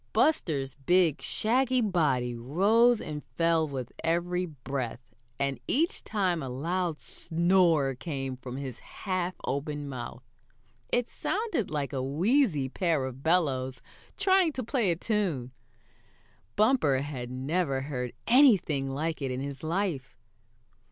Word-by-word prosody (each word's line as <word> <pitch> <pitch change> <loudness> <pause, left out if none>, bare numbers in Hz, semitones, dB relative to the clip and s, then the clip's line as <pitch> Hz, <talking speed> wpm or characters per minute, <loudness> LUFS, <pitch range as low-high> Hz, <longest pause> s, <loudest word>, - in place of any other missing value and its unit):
Buster's 150 - +1
big, 170 +1 +2
shaggy 255 +3 +1
body 150 - +1
rose 205 - +3
and 150 -1 -6
fell 165 -1 +2
with 130 -4 -5
every 175 +2 0
breath, 135 -5 -4 0.4
and 140 -1 -1
each 325 +6 +1
time 185 -6 0
a 135 - -4
loud 165 +5 -1
snore 170 -5 +2
came 135 -1 -4
from 125 0 -7
his 130 -4 -6
half 185 -2 -3
open 145 +1 -3
mouth. 125 -3 -7 0.7
It 245 -1 +1
sounded 415 - -2
like 145 -3 -3
a 135 - -1
wheezy 165 - +2
pair 160 -1 0
of 130 0 -7
bellows 140 -6 +1 0.3
trying 375 -4 +3
to 260 - -3
play 235 -4 +1
a 170 - +2
tune. 175 - -1 1.0
Bumper 210 - +3
had 130 -4 -5
never 135 +2 -1
heard 125 -3 -4
anything 205 - +4
like 155 +4 -2
it 135 - -1
in 130 0 -3
his 140 0 -5
life. 165 -4 -2
155 Hz, 130 wpm, -29 LUFS, 135-190 Hz, 1.0 s, anything